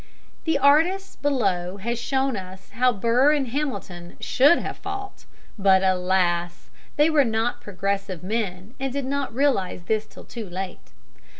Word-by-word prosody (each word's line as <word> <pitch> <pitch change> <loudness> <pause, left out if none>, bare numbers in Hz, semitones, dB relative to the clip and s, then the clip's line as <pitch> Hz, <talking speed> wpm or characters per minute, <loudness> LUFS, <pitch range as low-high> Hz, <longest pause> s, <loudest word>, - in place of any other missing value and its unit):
The 320 -3 +2
artist 325 +8 +3
has 220 -4 0
shown 265 +1 0
us 190 -1 -9
how 250 +4 +3
Burr 235 +7 +3
and 275 -4 0
Hamilton 220 -11 -4
should 285 +6 +4
have - - -5
fought, 400 0 -7 0.3
but, 195 -1 +5
alas! 180 -2 0 0.2
they 300 +2 +4
were 300 -2 +5
not 225 0 -1
progressive 195 -2 -3
men 200 0 -3
and 270 0 -2
did 280 0 -3
not 280 0 -2
realize 230 -9 0
this 215 +3 -1
till - - -13
too 225 -5 -7
late. 185 +1 -7
225 Hz, 140 wpm, -24 LUFS, 190-280 Hz, 0.3 s, but